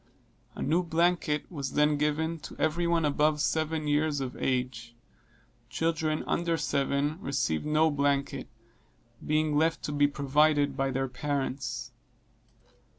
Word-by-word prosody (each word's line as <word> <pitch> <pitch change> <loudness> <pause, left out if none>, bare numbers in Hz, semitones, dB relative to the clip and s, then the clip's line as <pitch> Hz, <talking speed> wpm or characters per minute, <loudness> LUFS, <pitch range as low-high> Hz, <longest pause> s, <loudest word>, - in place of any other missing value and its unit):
A - - -4
new 170 +3 +2
blanket 165 -3 +1
was 140 -5 -4
then 150 0 +3
given 155 +3 0
to - - -10
every 170 +2 +1
one 170 -2 +2
above 150 +1 +2
seven 155 +1 0
years 150 0 +1
of 130 -2 -4
age 125 -2 -2 0.7
children 160 -1 -1
under 170 -1 0
seven 140 +3 -1
received 135 - -1
no 155 +1 +3
blanket, 140 -1 0 0.8
being 155 0 +1
left 160 +2 +1
to - - -3
be 145 0 +3
provided 145 +1 +2
for - - -12
by 135 0 0
their 135 0 -1
parents. 135 +1 -3
150 Hz, 135 wpm, -29 LUFS, 140-155 Hz, 0.8 s, then